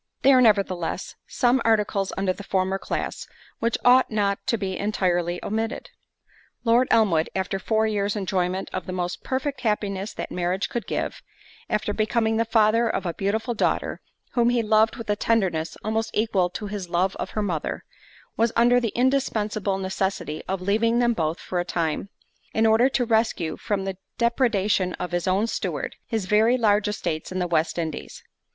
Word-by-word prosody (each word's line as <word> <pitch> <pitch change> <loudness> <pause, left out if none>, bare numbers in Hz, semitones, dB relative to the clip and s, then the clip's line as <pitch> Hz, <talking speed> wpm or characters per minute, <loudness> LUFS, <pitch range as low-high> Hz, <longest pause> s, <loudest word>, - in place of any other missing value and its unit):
There 270 0 +7
are, 255 - +6
nevertheless, 195 -7 +1
some 250 +1 +2
articles 210 -3 +1
under 190 -1 +1
the 200 - -10
former 190 0 0
class, - - -4 0.3
which 230 0 0
ought 255 +1 +6
not 200 -2 0
to 235 - +2
be 195 -3 -3
entirely 175 -4 0
omitted. 225 +3 -3 0.7
Lord 240 +2 +4
Elmwood, 175 -8 +3
after 190 0 -1
four 220 +2 +1
years 205 -1 0
enjoyment 185 -1 -1
of 185 - -4
the 185 - -4
most 180 0 -3
perfect 270 +2 -2
happiness 205 -3 -1
that - - -6
marriage 180 +2 -1
could 235 -5 -4
give, - - -3 0.5
after 210 -1 0
becoming 220 +1 +1
the 230 - +2
father 225 +1 +3
of - - -2
a 170 - -1
beautiful 220 +6 -1
daughter, 225 - -1 0.3
whom 240 -1 +3
he 240 -1 +2
loved 220 +1 +3
with 230 - -8
a 205 - +1
tenderness 185 -8 0
almost 220 +1 -1
equal 200 -5 +2
to 210 +4 -6
his 200 -3 -5
love 185 +2 +1
of - - -4
her 215 - +1
mother, 170 -6 -3 0.5
was 230 +1 +2
under 245 +1 +5
the 230 -4 -2
indispensable 215 -6 0
necessity 190 -4 -2
of 190 -1 -3
leaving 225 +4 +2
them 240 -1 +3
both 160 -4 -1
for 180 - -3
a - - +1
time, 170 +1 -2 0.5
in 220 - +3
order 225 +4 +5
to 255 -2 0
rescue 220 -8 +1
from 195 -2 -2
the 190 -1 -4 0.2
depredation 215 -6 +1
of 180 0 -5
his 175 0 -1
own 190 +4 +2
steward, 230 - -3
his 220 -5 -2
very 220 +5 +4
large 210 -3 +3
estates 170 -7 -3
in 185 - -3
the 180 - 0
West 165 -1 0
Indies. 160 -3 -5
210 Hz, 175 wpm, -24 LUFS, 185-225 Hz, 0.7 s, There